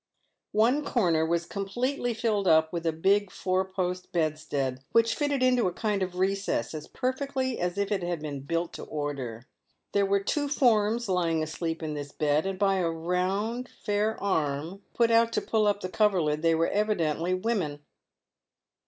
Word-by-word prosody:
One 245 +8 +3
corner 175 - +2
was 170 0 0
completely 240 +6 -2
filled 215 -4 0
up 160 0 +4
with 170 -1 -2
a - - +3
big 195 +5 +2
four 185 0 0
post 185 -1 -3
bedstead, 145 -5 -1
which 230 0 +4
fitted 285 -3 0
into 250 -4 +3
a - - 0
kind 210 +1 -1
of 185 -1 -2
recess 190 -10 0
as 155 -1 -6
perfectly 260 0 -2
as 175 +1 -1
if 200 0 -1
it 200 -2 +1
had 175 -1 -2
been 150 -2 -5
built 165 +5 -2
to - - -7
order. 135 -6 -4 0.5
There 200 -1 +2
were 200 0 +3
two 290 +7 0
forms 235 -4 +2
lying 170 -4 +1
asleep 160 +1 -4
in 155 -1 -3
this 145 -1 -6
bed, 150 +3 +1
and 195 -1 -3
by 195 0 +2
a 175 -3 +1
round, 185 +9 -1
fair 210 +1 -1
arm, 160 0 -1
put 235 -1 +3
out 230 0 +4
to - - +2
pull 215 -2 +1
up 205 0 +1
the - - -2
coverlid, 180 -8 +2
they 165 0 +3
were 165 +1 +1
evidently 180 -5 0
women. 185 -8 -2
185 Hz, 175 wpm, -28 LUFS, 160-215 Hz, 0.5 s, up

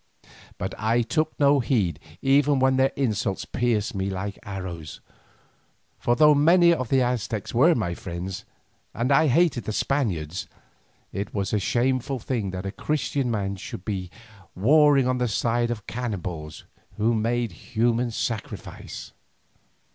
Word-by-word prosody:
But - - -4
I 115 +3 +2
took 155 +7 -1
no 140 0 +5
heed 105 - 0 0.2
even 140 +1 +4
when 130 0 +3
their 135 0 +3
insults 110 -6 -1
pierced 115 -4 0
me 95 -1 -2
like 100 +1 -4
arrows, 90 -6 -7 1.0
for 120 - +2
though 150 +2 +6
many 170 +4 +5
of 130 -8 -3
the 135 -1 +3
Aztecs 115 -4 -2
were 155 +9 +5
my 95 -7 -1
friends 90 +2 -6 0.5
and 120 +4 0
I 145 +3 +5
hated 145 -3 +2
the - - -2
Spaniards, 95 - -1 0.7
it 100 +1 -4
was 100 0 -1
a 105 - +3
shameful 130 +6 0
thing 115 -4 -2
that 95 +1 -5
a 95 - -2
Christian 140 +1 -1
man 100 -3 -2
should 90 0 -8
be 95 -4 -3 0.5
warring 140 +5 +5
on 130 0 0
the 125 - +1
side 120 +3 0
of 110 -4 -4
cannibals 90 -10 -5 0.3
who 110 +2 +2
made 115 0 0
human 120 +7 0
sacrifice. 115 -1 -5
115 Hz, 145 wpm, -25 LUFS, 100-130 Hz, 1.0 s, though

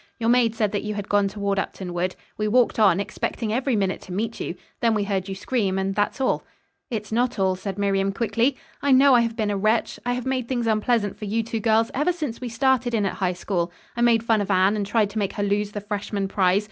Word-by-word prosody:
"Your 230 0 +1
maid 240 -2 +3
said 215 -3 +1
that 205 - -1
you 210 -1 -4
had 205 -1 -4
gone 205 -1 +3
toward 200 0 -1
Upton 185 -2 -4
Wood. 180 +1 -1 0.2
We 215 - -1
walked 240 +1 +3
on, 195 -4 +5
expecting 215 +2 -3
every 255 +1 +1
minute 195 -2 0
to - - -11
meet 220 +5 -3
you. 170 - -4 0.2
Then 230 -2 +2
we 205 - +1
heard 195 -1 -2
you 195 - -3
scream 195 -2 -1
and 195 0 -1
that's 205 +4 -1
all." 265 - +1 0.5
"It's 215 -3 -4
not 240 +2 +1
all," 190 -1 +2
said 190 +1 -5
Miriam 195 -1 +1
quickly. 235 +5 0 0.2
"I 280 -1 +3
know 270 +1 +6
I 240 - +6
have 230 -1 -1
been 215 -3 0
a 200 - -1
wretch. 215 +3 +1
I 245 - 0
have 250 -1 -4
made 260 -2 -1
things 240 -2 -1
unpleasant 215 -2 +1
for 210 - -5
you 225 +3 0
two 225 0 -3
girls 225 0 +2
ever 295 +7 +2
since 300 -10 -5
we 250 - -4
started 245 0 +1
in 210 -2 +1
at 195 - -1
High 185 -2 -1
School. 175 -1 -2 0.2
I 235 - -2
made 235 -2 +4
fun 225 -2 +2
of 200 - -3
Anne, 190 +2 +3
and 205 -2 -2
tried 210 -1 +1
to 215 - -3
make 200 -2 -1
her 205 - -2
lose 205 +1 0
the 205 - -4
freshman 205 -1 -3
prize. 190 -1 +2
210 Hz, 255 wpm, -24 LUFS, 195-235 Hz, 0.5 s, know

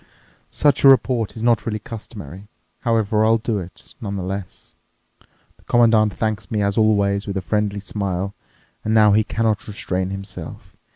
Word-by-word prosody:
Such 145 -2 +2
a - - +8
report 125 -4 +3
is 110 - -6
not 115 -2 +3
really 110 -2 -2
customary; 105 -4 -9 0.3
however, 110 -2 +1
I'll 110 +1 +4
do 115 -2 -2
it, 90 0 -11
nonetheless. 100 -2 -5 0.8
The - - -26
Commandant 115 -3 +4
thanks 110 0 -2
me, 105 -4 0
as 100 0 0
always, 100 -2 +2
with 100 -1 -3
a - - -1
friendly 105 0 -1
smile. 100 -1 -3 0.5
And 110 +1 0
now 105 -1 +6
he 110 +2 +4
cannot 110 -1 -1
restrain 95 -3 -3
himself. 95 -3 -8
105 Hz, 155 wpm, -21 LUFS, 100-110 Hz, 0.8 s, a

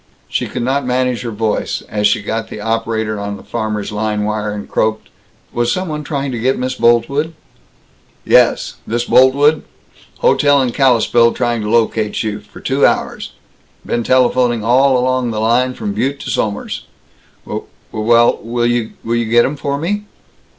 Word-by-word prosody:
She - - -2
could 125 - -4
not 135 +3 0
manage 125 -1 0
her 120 - -4
voice, 110 -1 -2
as 105 -1 +1
she 105 0 0
got 110 +1 -3
the - - -7
operator 110 -1 -2
on 100 0 -4
the - - -14
farmers' 110 -3 -3
line 105 0 -1
wire, 105 0 -2
and 105 0 -6
croaked, 110 0 -1 0.4
"Was 120 0 0
some 185 +3 -2
one 150 -1 -4
trying 140 -2 -3
to 120 - -4
get 130 +4 +1
Miss 130 +1 -2
Boltwood?" 125 +7 +1 0.9
"Yes. - - +3
This 120 +2 -1
Boltwood? 135 +5 +4 0.6
Hotel 145 -1 +4
in 125 - -1
Kalispell 120 -3 +3
trying 120 -2 -1
to 105 - -3
locate 110 -1 +1
you, 105 -1 -3
for - - -15
two - - 0
hours. - - 0 0.5
Been 120 - -1
telephoning 125 -2 +2
all 130 +3 +4
along 130 0 0
the 110 -2 -3
line, 125 +3 +1
from 205 -2 -4
Butte 140 -4 -1
to 130 - -4
Somers." 105 -2 -3 0.6
"W - - -5 0.2
well, 115 +2 +3
w - - -18 0.6
will 115 +1 -1
you 120 0 0
g - - -6
get 120 +1 +5
'em 140 - -2
for 140 -1 -2
me?" 205 +7 -2
120 Hz, 170 wpm, -16 LUFS, 110-130 Hz, 0.9 s, get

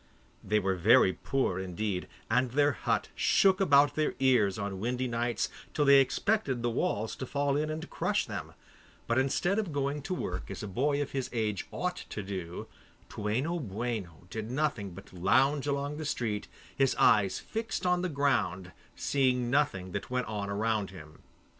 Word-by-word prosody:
They 105 +2 +1
were 95 -2 +1
very 95 +1 +5
poor 130 -8 -1
indeed, 95 +1 -3 0.2
and 125 +3 +2
their 145 +3 +3
hut - - -1
shook 190 0 +3
about 145 -5 +5
their 155 -1 0
ears 120 -8 +3
on 100 -2 -4
windy 125 +4 -1
nights, 120 -1 -1 0.3
till 150 - +2
they 140 0 +8
expected 135 - +1
the 120 - +1
walls 110 -1 -1
to 130 - -5
fall 140 0 0
in 155 +1 0
and 155 +1 -4
crush - - 0
them, - - -6 0.5
but 115 +2 +2
instead 175 +9 +1
of 200 -6 -2
going 145 +1 -1
to 185 +6 -3
work 90 - -4
as 95 - -6
a - - -4
boy 140 +8 +1
of 140 - -9
his 135 -2 -2
age 110 -4 -2
ought 180 0 -2
to 105 - -5
do, 95 -3 -5 0.4
Toueno 130 +12 -1
Boueno 105 - -4
did 110 0 -4
nothing 130 -7 -1
but 95 - -12
lounge 130 +11 +2
along 140 +1 -1
the 155 - -4
street, 110 -7 -2 0.3
his 135 -1 +2
eyes 100 -3 +4
fixed 225 -3 -4
on 180 0 +2
the 180 - -1
ground, 110 - 0 0.2
seeing 125 -3 +1
nothing 100 -11 +1
that 100 - -4
went 125 0 -1
on 105 -2 -4
round 105 0 0
him. 80 -5 -12
125 Hz, 175 wpm, -30 LUFS, 100-145 Hz, 0.5 s, they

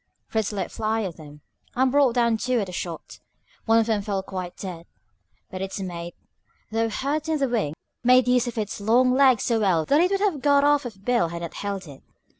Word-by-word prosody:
Fritz 220 -2 -1
let 200 -2 -4
fly 220 0 -1
at 180 -5 -5
them, 150 -2 -13 0.3
and 260 +1 +2
brought 275 -3 +3
down 235 -2 +3
two 250 +3 0
at 200 - -2
a - - -7
shot. 175 -2 -6 0.5
One 225 0 +4
of 225 - +3
them 220 -2 0
fell 200 -2 -2
quite 185 -2 -6
dead, 175 -3 -7 0.6
but 185 - -6
its 195 +1 -4
mate, 175 -2 -6 0.6
though 225 +1 0
hurt 285 +7 -2
in 315 - +1
the 275 -2 +1
wing, 215 - -1 0.3
made 250 0 +5
use 250 0 +3
of 240 - -5
its 210 -1 -3
long 245 +4 +3
legs 260 -4 +4
so 230 -2 +1
well 180 -7 +2
that 290 +3 +3
it 360 - +3
would 395 0 0
have 385 -9 0
got 285 0 +4
off 290 -2 +3
if 195 -4 -13
Bill 245 -9 +2
had 170 +1 -6
not 170 - -6
held 200 -2 -4
it. 140 -4 -12
225 Hz, 225 wpm, -24 LUFS, 190-255 Hz, 0.6 s, made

